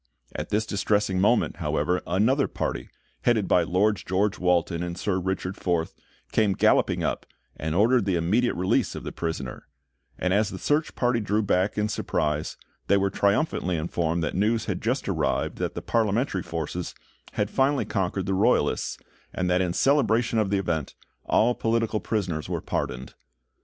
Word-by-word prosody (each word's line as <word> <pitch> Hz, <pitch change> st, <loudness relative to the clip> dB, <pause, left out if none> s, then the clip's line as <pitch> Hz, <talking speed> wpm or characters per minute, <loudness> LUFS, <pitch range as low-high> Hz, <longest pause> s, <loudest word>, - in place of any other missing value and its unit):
At -, -, -5 dB
this 110 Hz, +1 st, +1 dB
distressing 100 Hz, -2 st, 0 dB
moment, 120 Hz, +4 st, +2 dB
however, 90 Hz, 0 st, 0 dB
another 115 Hz, +10 st, +2 dB
party, -, -, -4 dB, 0.3 s
headed 115 Hz, -4 st, +2 dB
by 90 Hz, -, +4 dB
Lord 100 Hz, +5 st, +2 dB
George 95 Hz, +3 st, -1 dB
Walton 90 Hz, -1 st, +1 dB
and 85 Hz, 0 st, -4 dB
Sir 95 Hz, 0 st, 0 dB
Richard 95 Hz, +1 st, -3 dB
Forth, 85 Hz, -3 st, -1 dB, 0.4 s
came 105 Hz, -3 st, +2 dB
galloping -, -, +2 dB
up, -, -, -2 dB, 0.3 s
and 80 Hz, +1 st, -3 dB
ordered 115 Hz, +3 st, +4 dB
the 95 Hz, -3 st, +1 dB
immediate 105 Hz, +9 st, +1 dB
release 95 Hz, +1 st, +1 dB
of -, -, -6 dB
the -, -, -5 dB
prisoner; 80 Hz, -6 st, -5 dB, 0.5 s
and 90 Hz, 0 st, 0 dB
as 105 Hz, +1 st, +2 dB
the -, -, -6 dB
search 150 Hz, +1 st, 0 dB
party 120 Hz, -1 st, +1 dB
drew 105 Hz, 0 st, 0 dB
back 95 Hz, +1 st, +1 dB
in 105 Hz, 0 st, +1 dB
surprise, 75 Hz, -7 st, -2 dB, 0.3 s
they 100 Hz, -, +4 dB
were 100 Hz, 0 st, +1 dB
triumphantly 100 Hz, -, +1 dB
informed 85 Hz, +1 st, -1 dB
that 75 Hz, -, -2 dB
news 110 Hz, +4 st, +1 dB
had -, -, -3 dB
just -, -, -1 dB
arrived -, -, -1 dB
that -, -, -2 dB
the -, -, -5 dB
Parliamentary 110 Hz, -2 st, 0 dB
forces 85 Hz, +2 st, -4 dB, 0.4 s
had 105 Hz, 0 st, -1 dB
finally 135 Hz, +1 st, +2 dB
conquered 95 Hz, -1 st, -1 dB
the 95 Hz, -, -1 dB
Royalists, 95 Hz, -, +1 dB, 0.3 s
and 90 Hz, -1 st, -1 dB
that 90 Hz, +1 st, +3 dB
in 90 Hz, -2 st, 0 dB
celebration 120 Hz, -1 st, +2 dB
of 105 Hz, -3 st, +1 dB
the 100 Hz, -, +1 dB
event, 85 Hz, -7 st, -2 dB, 0.3 s
all 120 Hz, +3 st, +3 dB
political 115 Hz, -2 st, 0 dB
prisoners 90 Hz, -10 st, -2 dB
were -, -, -1 dB
pardoned. 65 Hz, +1 st, -4 dB
95 Hz, 170 wpm, -26 LUFS, 90-110 Hz, 0.5 s, by